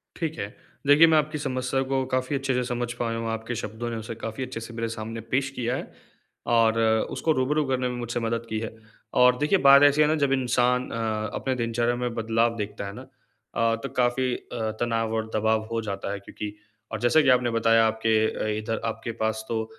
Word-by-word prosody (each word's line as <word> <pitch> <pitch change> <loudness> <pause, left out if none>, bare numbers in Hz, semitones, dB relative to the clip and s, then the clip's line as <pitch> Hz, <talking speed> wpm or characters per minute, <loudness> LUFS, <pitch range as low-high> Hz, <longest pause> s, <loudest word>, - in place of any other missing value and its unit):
ठीक 160 -2 -3
है, 100 - -2 0.4
देखिए 145 +3 +8
मैं 160 -1 +5
आपकी 155 0 0
समस्या 130 -1 -1
को 135 -1 +1
काफ़ी 130 +2 0
अच्छे 135 -1 -1
से 125 0 +1
समझ 120 -1 -2
पाया 115 -1 -2
हूँ, 115 0 -3
आपके 115 +2 -4
शब्दों 110 +2 -4
ने 115 - -4
उसे 115 +1 -6
काफ़ी 115 +3 -5
अच्छे 125 -2 -6
से 115 +1 -9
मेरे 115 0 -2
सामने 115 0 -5
पेश 135 +1 +2
किया 120 +1 -1
है - - -6 0.6
और 115 -1 +4 0.3
उसको 160 - 0
रूबरू 150 +2 +1
करने 130 -1 0
में 125 - -4
मुझसे 120 0 -3
मदद 115 0 -2
की 110 - -2
है 115 0 -6 0.5
और 125 0 +6
देखिए 150 +8 +2
बात 140 +1 +9
ऐसी 145 +1 +5
है 150 - +5
ना 155 - +2
जब 140 -3 +1
इंसान 125 -1 +1
अ, 110 -2 -2
अपने 130 -1 -1
दिनचर्या 120 0 0
में 125 -1 -2
बदलाव 115 +1 +1
देखता 105 -1 -4
है 100 - -6
ना - - -9
अ, 115 0 -3
तो 135 - -3
काफ़ी 125 +1 +2
अ, 110 -2 -4
तनाव 115 -1 0
और 110 0 -2
दबाव 110 0 +1
हो 115 0 -1
जाता 100 -2 -4
है 100 - -4
क्योंकि 105 +1 -7 0.4
और - - -3
जैसा 120 +6 +5
कि 145 - +3
आपने 125 -1 +4
बताया 115 0 +4
आपके 110 0 0 0.2
अ, - - -3
इधर 110 +1 -3
आपके 115 +1 -3
पास 110 0 -1
तो 110 -1 -1
120 Hz, 220 wpm, -26 LUFS, 115-130 Hz, 0.6 s, बात